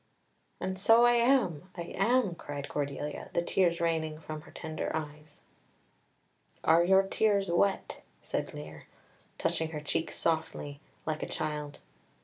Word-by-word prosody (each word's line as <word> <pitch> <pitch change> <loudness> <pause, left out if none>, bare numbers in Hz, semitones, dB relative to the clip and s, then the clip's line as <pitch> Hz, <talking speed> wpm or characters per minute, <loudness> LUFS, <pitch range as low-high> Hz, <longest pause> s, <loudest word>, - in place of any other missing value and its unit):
"And 190 +1 -3
so 225 +4 +6
I 240 - +6
am, 235 - +2
I 170 - -3
am," 220 -1 +3
cried 145 -4 -6
Cordelia, 145 0 -4
the 170 - +1
tears 175 -1 +2
raining 160 -2 0
from 155 -1 -6
her - - -15
tender 160 -1 -4
eyes. 150 -1 -7 1.2
"Are 165 +2 +5
your 190 +2 +5
tears 200 -1 +1
wet?" 195 +3 +1 0.2
said - - -3
Lear, 75 +1 -9 0.5
touching 160 0 0
her 155 -2 -4
cheeks 160 +2 -2
softly, 160 -3 -1 0.2
like 155 -1 -2
a - - -3
child. 150 -1 -4
160 Hz, 135 wpm, -30 LUFS, 150-190 Hz, 1.2 s, so